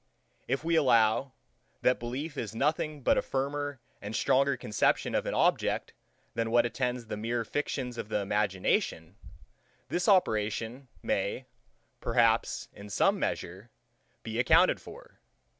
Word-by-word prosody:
If 135 +3 -1
we 165 0 +1
allow, 130 -2 +3 0.5
that 125 - +3
belief 135 +6 -5
is 110 -5 -5
nothing 150 +2 -1
but - - +4
a - - 0
firmer 140 +1 -3 0.2
and 105 +2 -5
stronger 135 +1 +2
conception 105 -3 +1
of - - 0
an - - -1
object - - +1 0.4
than 115 -1 -1
what 120 +1 +4
attends 125 0 -2
the 105 - -5
mere 115 +2 -2
fictions 125 -3 -3
of 105 - -5
the 110 - 0
imagination, 100 -4 0 0.7
this 175 +3 0
operation 115 - +1 0.2
may, - - -1 0.5
perhaps, - - +2
in 100 +1 -11
some 100 - +2
measure, 95 +7 -4 0.5
be 115 0 -4
accounted 120 - +4
for. - - -13
120 Hz, 135 wpm, -29 LUFS, 110-140 Hz, 0.7 s, but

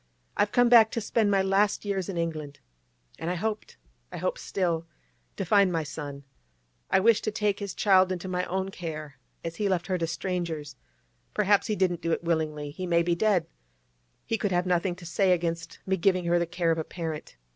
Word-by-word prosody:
'I've 205 0 +2
come 245 -1 +4
back 230 -2 +7
to - - 0
spend 220 -1 +1
my 195 -1 +3
last 200 +2 +2
years 195 -2 -2
in 185 - -4
England, 155 -4 -3 0.6
and 165 - -3
I 180 - 0
hoped—I - - -6
hope - - -2
still—to 170 +1 -4
find 200 0 +4
my 165 -2 0
son. 145 -2 -7 0.7
I - - +4
wish 225 +2 +4
to - - -1
take 205 -1 0
his 200 -2 -5
child 190 -2 +4
into 185 0 -4
my 180 -1 -1
own 190 +1 -2
care; 155 -6 -7 0.2
as 165 0 -5
he 205 -2 0
left 180 -2 0
her 185 -2 -1
to 165 - 0
strangers—perhaps 160 - -2
he 215 - 0
didn't 180 -3 +1
do 165 - -1
it - - -2
willingly; 155 -3 -1
he 180 +5 -5
may 170 -1 +3
be 170 0 +1
dead—he - - -3
could 205 - 0
have 180 0 +1
nothing 180 0 +1
to 180 -1 -12
say 185 +3 +3
against 165 -1 -2
me 190 0 +1
giving 185 0 +2
her 175 0 +3
the 170 - 0
care 170 -1 0
of 165 - 0
a - - -1
parent. 160 -2 -6
175 Hz, 195 wpm, -27 LUFS, 160-195 Hz, 0.7 s, back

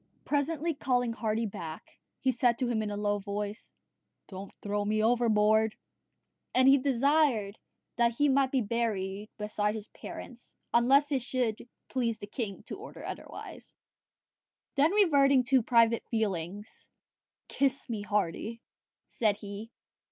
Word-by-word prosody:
Presently 310 +3 0
calling 245 -4 0
Hardy 225 0 -1
back, 170 -6 -8 0.2
he 260 - +2
said 245 -1 +2
to 255 - -1
him 230 -2 0
in 215 - -2
a 205 - -4
low 205 0 0
voice, 205 +1 -5 0.6
"Don't 195 0 -8
throw 205 0 -2
me 215 +1 +1
overboard:" 220 -2 +3 0.8
and 255 +1 +5
he 275 +1 +7
desired 260 -5 +2 0.4
that 235 0 +3
he 290 - +4
might 270 -1 +3
be 265 - +2
buried 210 -2 -2
beside 210 0 -1
his 215 -1 -7
parents, 245 -1 -10 0.2
unless 275 +5 +4
it 270 -2 +1
should 240 -2 -2 0.2
please 235 -4 -1
the 205 - -7
king 205 -2 -5
to - - -8
order - - -9
otherwise. - - -8 1.0
Then 300 +2 +3
reverting 280 -10 +5
to 260 0 +3
private 230 0 +4
feelings, 205 -2 -3 0.6
"Kiss 275 -1 0
me, 225 -4 -3
Hardy," 205 +2 -2 0.5
said 215 -3 +1
he. 205 +1 -8
230 Hz, 135 wpm, -30 LUFS, 210-260 Hz, 1.0 s, he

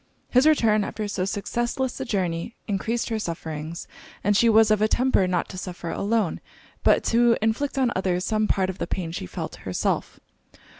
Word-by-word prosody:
His 255 +4 +5
return 220 -9 +4
after 215 +1 -4
so 190 -2 -2
successless 240 +6 -2
a 265 - -3
journey 185 -2 -2
encreased 225 +4 -1
her 225 -1 -1
sufferings, 160 -3 -5 0.4
and 205 +1 +3
she 230 +3 +5
was 220 0 +5
of 215 -1 +3
a 215 - +4
temper 245 -5 +2
not 180 -2 0
to 185 - -6
suffer 175 -2 -6
alone, 210 -3 0 0.4
but - - +4
to 235 0 +5
inflict 225 +6 -1
on 255 -3 +2
others 185 -1 0
some 215 -1 +1
part 190 -1 +1
of 185 - -14
the - - -2
pain 175 -4 -3
she 130 - -5
felt - - -6
herself. - - -2
210 Hz, 185 wpm, -25 LUFS, 185-230 Hz, 0.4 s, His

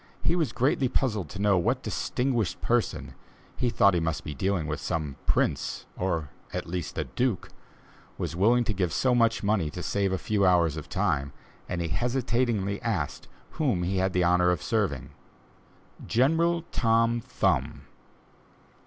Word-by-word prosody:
He 170 - +2
was 165 -5 0
greatly 130 0 +1
puzzled 110 -8 0
to 100 - -8
know 100 -2 +3
what 120 +8 0
distinguished 125 -6 -1
person - - -1 0.4
he 125 - 0
thought 100 -4 +4
he 85 - +2
must 80 -1 -2
be 75 - -5
dealing 95 +2 -1
with 75 0 -3
some 75 -4 -3
prince, - - 0
or, 80 -6 -2 0.2
at - - -3
least, 85 -2 -4
a - - +1
duke 125 -7 -1 0.7
was - - -3
willing 115 +7 +4
to 110 - -1
give 90 -4 -1
so 125 +6 +2
much 115 -3 +2
money 100 -6 +1
to 90 +3 -7
save 100 -1 0
a 95 - 0
few 105 +1 0
hours 85 -5 +4
of 80 - -7
time, 70 0 0 0.4
and 90 -1 -2
he 85 - -2
hesitatingly 120 - 0
asked 95 - -2 0.2
whom 125 - 0
he 95 +2 -1
had 95 +1 +1
the 90 - +2
honor 90 +1 +4
of 90 -3 0
serving. 70 - -1 1.0
"General 165 +7 +2
Tom 115 0 +2
Thumb." 125 +1 0
100 Hz, 160 wpm, -27 LUFS, 85-120 Hz, 1.0 s, thought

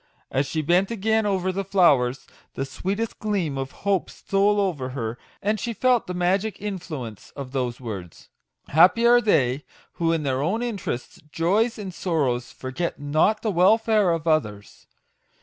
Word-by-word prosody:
As 135 +1 0
she 155 +3 -2
bent 180 +5 +3
again 220 0 +1
over 190 -2 0
the 195 +2 -2
flowers, 150 -10 +3 0.3
the 135 - -2
sweetest 195 +11 -3
gleam 195 -9 -1
of 135 0 -3 0.2
hope 195 -3 +1
stole 200 +1 +1
over 160 -10 -1
her, 115 -1 -4 0.2
and 210 +1 +1
she 235 +3 -3
felt 250 +2 +2
the 180 - -4
magic 190 +4 0
influence 160 - -6
of 135 -3 -7
those 125 -3 -2
words. 100 -9 -8 0.4
Happy 180 +9 +5
are 240 0 +6
they 135 - +2 0.4
who 165 -1 +3
in 165 -2 0
their 135 -1 0
own 205 +10 0
interests, 200 - -4
joys, 205 +10 +1
and 195 -4 -6
sorrows, 140 -10 -1
forget 135 +7 -4
not 155 +9 +1
the 220 - +1
welfare 210 +2 +4
of 165 -2 -1
others 105 -11 -1
175 Hz, 160 wpm, -24 LUFS, 135-205 Hz, 0.4 s, are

